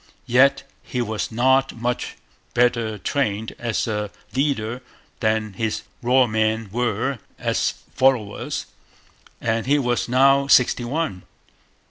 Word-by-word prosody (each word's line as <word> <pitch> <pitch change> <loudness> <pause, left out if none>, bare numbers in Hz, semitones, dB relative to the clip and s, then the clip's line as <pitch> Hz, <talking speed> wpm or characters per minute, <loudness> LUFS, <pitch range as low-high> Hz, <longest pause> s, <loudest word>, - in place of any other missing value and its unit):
Yet 140 +3 +4 0.2
he 125 - -5
was 110 -2 -2
not 130 +3 +3
much 120 +1 -3 0.4
better 115 -3 +2
trained 110 -2 -2
as 115 -3 -1
a 105 -2 -2 0.3
leader 130 -4 0 0.4
than 110 -1 0
his 110 +2 -2 0.2
raw 125 +2 +4
men 110 -1 0
were 120 +2 -1 0.2
as - - 0 0.2
followers, 125 -6 +1 0.7
and 115 0 -1
he 145 +2 +4
was 125 -3 0
now 135 +2 +4
sixty 125 -2 +4
one. 135 - -2
120 Hz, 115 wpm, -22 LUFS, 110-130 Hz, 0.7 s, Yet